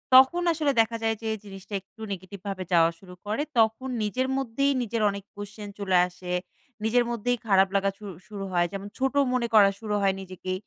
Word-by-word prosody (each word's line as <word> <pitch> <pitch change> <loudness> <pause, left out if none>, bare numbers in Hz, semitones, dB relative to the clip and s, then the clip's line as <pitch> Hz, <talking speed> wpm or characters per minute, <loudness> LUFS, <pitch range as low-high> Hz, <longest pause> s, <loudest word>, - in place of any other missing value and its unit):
তখন 265 +7 +7
আসলে 305 -3 +1
দেখা 230 +1 -1
যায় 225 0 +2
যে 225 - -2
জিনিসটা 195 0 -11
একটু 200 +4 -19
negative 190 +1 -9
ভাবে 195 -2 -3
যাওয়া 165 -1 +6
শুরু 180 -2 -13
করে, 215 +7 -1 0.2
তখন 225 +4 +2
নিজের 255 +5 0
মধ্যেই 270 +2 +1
নিজের 230 0 -2
অনেক 200 0 -5
question 205 +1 -8
চলে 190 -2 +2
আসে। 180 0 -8 0.5
নিজের 240 +3 +3
মধ্যেই 245 +1 0
খারাপ 195 -1 +5
লাগা 195 0 +3
শু 210 - -11 0.2
শুরু 205 -1 -6
হয়। 175 0 +3
যেমন 195 0 -5
ছোট 265 +1 0 0.2
মনে 245 -2 +1
করা 205 -2 +8
শুরু 210 -2 -2
হয় 195 -1 +3
নিজেকে। 185 0 -5
210 Hz, 190 wpm, -26 LUFS, 195-235 Hz, 0.5 s, করা